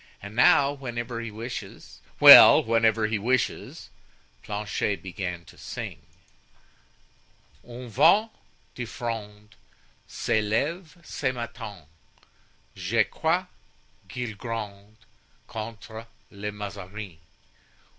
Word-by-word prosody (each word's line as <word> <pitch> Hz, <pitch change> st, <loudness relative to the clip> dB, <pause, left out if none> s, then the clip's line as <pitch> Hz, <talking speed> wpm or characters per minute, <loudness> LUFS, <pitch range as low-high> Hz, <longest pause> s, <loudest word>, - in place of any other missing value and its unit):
And 100 Hz, +2 st, -10 dB
now, 140 Hz, +3 st, +5 dB
whenever 120 Hz, -3 st, -5 dB
he 115 Hz, -, -5 dB
wishes——" 115 Hz, +4 st, -8 dB, 0.2 s
"Well, -, -, +10 dB
whenever 115 Hz, -1 st, +2 dB
he 110 Hz, 0 st, -1 dB
wishes?" 125 Hz, +4 st, -2 dB, 0.5 s
Planchet 105 Hz, -1 st, -3 dB
began 90 Hz, -2 st, -5 dB
to -, -, -17 dB
sing: -, -, -7 dB, 1.6 s
"Un 125 Hz, +1 st, -10 dB
vent 215 Hz, -, +4 dB, 0.4 s
de 120 Hz, -, -5 dB
fronde 110 Hz, -2 st, -7 dB, 0.5 s
S'est 110 Hz, -, -1 dB
leve 155 Hz, -, -2 dB
ce 140 Hz, -3 st, -2 dB
matin; 115 Hz, -7 st, -8 dB, 0.9 s
Je 100 Hz, +5 st, +1 dB
crois 165 Hz, -, -1 dB, 0.6 s
qu'il 120 Hz, -4 st, -5 dB
gronde 105 Hz, -2 st, -7 dB, 0.5 s
Contre 110 Hz, 0 st, -8 dB, 0.2 s
le 105 Hz, +1 st, -5 dB
Mazarin. 100 Hz, -3 st, -8 dB
110 Hz, 95 wpm, -26 LUFS, 105-120 Hz, 1.6 s, Well